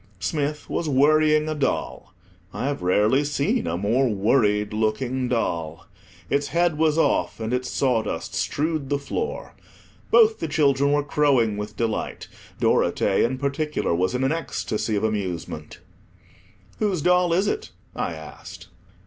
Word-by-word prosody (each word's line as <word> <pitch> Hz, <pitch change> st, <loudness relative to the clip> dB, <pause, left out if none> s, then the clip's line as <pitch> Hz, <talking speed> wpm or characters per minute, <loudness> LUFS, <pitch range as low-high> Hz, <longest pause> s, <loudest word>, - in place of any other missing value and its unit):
Smith 150 Hz, -, -2 dB
was 165 Hz, -, -2 dB
worrying 155 Hz, +2 st, +4 dB
a 155 Hz, -, -1 dB
doll. 145 Hz, -3 st, -2 dB, 0.4 s
I -, -, -3 dB
have 140 Hz, -5 st, -2 dB
rarely 105 Hz, +9 st, +3 dB
seen 145 Hz, -10 st, 0 dB
a 85 Hz, +1 st, -1 dB
more 115 Hz, +7 st, +1 dB
worried 105 Hz, 0 st, +1 dB
looking 120 Hz, +4 st, -1 dB
doll. 85 Hz, -7 st, -2 dB, 0.4 s
Its 140 Hz, +6 st, 0 dB
head 170 Hz, -1 st, +1 dB
was 160 Hz, -1 st, +2 dB
off, 165 Hz, -, +1 dB
and 110 Hz, +2 st, -3 dB
its 125 Hz, 0 st, -1 dB
sawdust 125 Hz, -5 st, -1 dB
strewed 155 Hz, -2 st, -1 dB
the 145 Hz, -, +1 dB
floor. 295 Hz, -, -4 dB, 0.6 s
Both 445 Hz, -2 st, +5 dB
the -, -, -2 dB
children 140 Hz, -2 st, +2 dB
were 145 Hz, 0 st, +2 dB
crowing 140 Hz, -7 st, +2 dB
with 105 Hz, 0 st, -6 dB
delight; 115 Hz, -2 st, -3 dB, 0.3 s
Dorothea, 95 Hz, -, +2 dB
in 130 Hz, +2 st, -4 dB
particular, 140 Hz, -, -1 dB
was 90 Hz, +7 st, 0 dB
in 125 Hz, -, 0 dB
an 135 Hz, -, +2 dB
ecstasy 115 Hz, -9 st, -2 dB
of 100 Hz, -, -1 dB
amusement. 100 Hz, -6 st, -4 dB, 1.0 s
"Whose 195 Hz, -8 st, 0 dB
doll 180 Hz, -1 st, +3 dB
is 185 Hz, +4 st, +2 dB
it?" 430 Hz, +1 st, -2 dB, 0.3 s
I -, -, -2 dB
asked. -, -, -11 dB
135 Hz, 145 wpm, -24 LUFS, 110-150 Hz, 1.0 s, Both